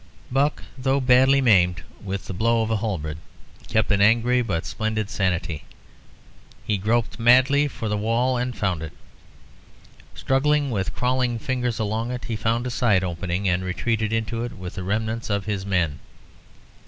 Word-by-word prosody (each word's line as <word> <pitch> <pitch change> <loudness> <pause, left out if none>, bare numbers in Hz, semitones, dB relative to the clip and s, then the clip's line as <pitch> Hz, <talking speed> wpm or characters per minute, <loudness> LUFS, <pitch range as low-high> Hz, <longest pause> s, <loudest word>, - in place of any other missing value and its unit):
Buck, 140 +3 +1 0.2
though 135 +2 +1
badly 130 +1 +5
maimed 90 - +3 0.2
with 100 0 -4
the - - -6
blow 115 +4 +2
of 110 - -3
a 110 - +2
halberd, 85 -8 -3 0.5
kept 110 -1 +1
an 100 0 +3
angry 120 +4 +4
but 95 -9 -2
splendid 110 -1 -2
sanity. 90 -5 -1 1.0
He 105 -2 0
groped 110 +4 0
madly 130 +5 +5
for 115 -5 -5
the 105 - 0
wall 115 +4 +1
and 125 0 -2
found 95 -6 -1
it. 80 -1 -7 1.2
Struggling 145 +1 +1
with 95 -4 -2
crawling 125 -1 0
fingers 125 -3 -2
along 110 +1 -2
it, 125 0 -5
he 115 - -3
found 115 +2 0
a 125 - -3
side 105 -6 +2
opening 90 +2 -2
and 90 0 +1
retreated 110 +4 -1
into 115 +1 -1
it 120 - -5
with 90 -1 -8
the 95 - -6
remnants 110 +4 -2
of 100 -1 -1
his 100 -2 -3
men. 85 -7 0
110 Hz, 165 wpm, -23 LUFS, 95-125 Hz, 1.2 s, badly